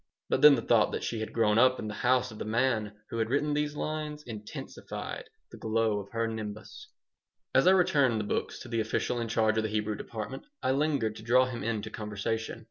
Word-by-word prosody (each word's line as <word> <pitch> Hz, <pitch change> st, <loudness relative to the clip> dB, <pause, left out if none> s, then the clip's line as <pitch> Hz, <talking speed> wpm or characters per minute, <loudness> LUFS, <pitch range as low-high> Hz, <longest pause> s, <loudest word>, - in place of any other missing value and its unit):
But 130 Hz, -, +1 dB
then 150 Hz, -1 st, +9 dB
the 115 Hz, -, -3 dB
thought 115 Hz, -3 st, +3 dB
that -, -, -3 dB
she 115 Hz, -, -2 dB
had 110 Hz, -, -4 dB
grown 110 Hz, -1 st, +3 dB
up 130 Hz, +1 st, +5 dB
in 110 Hz, -, -5 dB
the 105 Hz, -, -4 dB
house 125 Hz, +2 st, +2 dB
of 110 Hz, -, -10 dB
the -, -, -2 dB
man 110 Hz, -1 st, +1 dB, 0.2 s
who 115 Hz, -, -2 dB
had 110 Hz, 0 st, 0 dB
written 145 Hz, +3 st, +1 dB
these 150 Hz, 0 st, -1 dB
lines 150 Hz, 0 st, -4 dB
intensified 105 Hz, -4 st, -7 dB, 0.3 s
the -, -, -11 dB
glow 110 Hz, -1 st, +1 dB
of 100 Hz, 0 st, -9 dB
her 115 Hz, 0 st, -1 dB
nimbus 110 Hz, -, -7 dB, 0.7 s
As -, -, +4 dB
I -, -, +9 dB
returned 140 Hz, -10 st, +3 dB
the -, -, -1 dB
books 105 Hz, -, -2 dB
to -, -, -9 dB
the 115 Hz, -1 st, 0 dB
official 110 Hz, +2 st, -1 dB
in 115 Hz, -, -2 dB
charge 110 Hz, -1 st, +2 dB
of 110 Hz, -, +2 dB
the 110 Hz, -, -1 dB
Hebrew 105 Hz, 0 st, -1 dB
department 110 Hz, +5 st, -6 dB, 0.2 s
I 130 Hz, -, +2 dB
lingered 135 Hz, -6 st, +1 dB
to -, -, -9 dB
draw 125 Hz, +3 st, +4 dB
him 125 Hz, -2 st, -5 dB
into 110 Hz, -1 st, -2 dB
conversation. 110 Hz, +2 st, -3 dB
115 Hz, 220 wpm, -29 LUFS, 110-130 Hz, 0.7 s, then